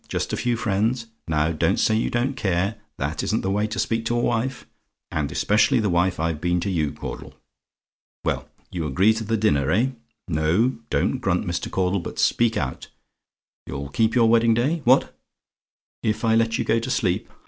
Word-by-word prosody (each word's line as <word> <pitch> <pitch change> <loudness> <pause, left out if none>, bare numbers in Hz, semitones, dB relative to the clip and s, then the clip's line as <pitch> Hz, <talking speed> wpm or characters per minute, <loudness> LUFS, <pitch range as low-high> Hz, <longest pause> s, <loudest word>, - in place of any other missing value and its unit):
Just - - -3
a - - 0
few 120 -1 0
friends? 115 +3 0 0.2
Now 80 0 +1
don't 80 - +1
say 110 - +2
you 110 - 0
don't 125 +3 0
care 95 0 0 0.2
that 70 +2 -2
isn't - - 0
the 95 - -1
way 105 +2 +1
to 110 - -5
speak 115 0 0
to 120 +1 0
a - - +2
wife; 120 +2 -1 0.5
and 75 -2 -2
especially 110 - +3
the 105 -4 0
wife 90 0 +1
I've 80 -1 -1
been 90 0 +1
to 100 - -2
you, 75 -5 0
Caudle. - - -8 0.9
Well, - - -2 0.2
you 85 -4 -3
agree 95 +10 +3
to 110 0 -4
the 115 +1 0
dinner, 75 -11 +2
eh? 125 +5 +2 0.4
Now, 85 +9 +2 0.2
don't - - 0
grunt, - - 0
Mr. - - -3
Caudle, 95 +1 0
but 85 - -7
speak 115 -1 +2
out. 65 -3 -3 0.8
You'll 70 +1 -5
keep 110 - +1
your 115 -2 +5
wedding 115 0 +4
day? 145 +8 0
What? 130 +2 +4 0.9
"IF 110 +2 -1
I 110 - +3
LET 115 0 +2
YOU - - -1
GO 115 +1 +2
TO 115 - -5
SLEEP? 90 -8 0
110 Hz, 190 wpm, -23 LUFS, 85-115 Hz, 0.9 s, your